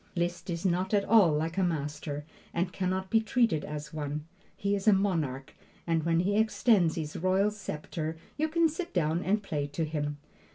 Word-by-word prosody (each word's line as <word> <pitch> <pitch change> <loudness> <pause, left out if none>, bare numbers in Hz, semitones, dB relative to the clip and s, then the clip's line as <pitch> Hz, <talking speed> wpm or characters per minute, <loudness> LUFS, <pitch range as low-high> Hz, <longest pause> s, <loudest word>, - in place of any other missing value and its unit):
Liszt 175 +1 -2
is 170 +1 -3
not 185 +3 +1
at 200 -1 +2
all 205 -6 +6
like 160 +4 -1
a - - +3
master, 150 -3 -2 0.3
and 180 +2 0
can 185 -2 -1
not 190 0 -2
be 225 - +5
treated 225 - +2
as 150 0 -6
one. 150 0 -4 0.3
He 200 0 0
is 200 +1 -2
a 215 - +8
monarch, 160 -10 0 0.3
and 165 -1 +1
when 165 +1 +2
he 200 +3 +1
extends 220 -5 +3
his 155 -2 -4
royal 190 +4 +2
scepter 160 -5 -5 0.2
you 310 +1 +1
can 335 +1 +4
sit 335 - -5
down 165 0 +1
and 205 +3 +1
play 150 -6 -2
to 155 +3 -2
him. 145 -1 -3
175 Hz, 195 wpm, -29 LUFS, 155-200 Hz, 0.3 s, a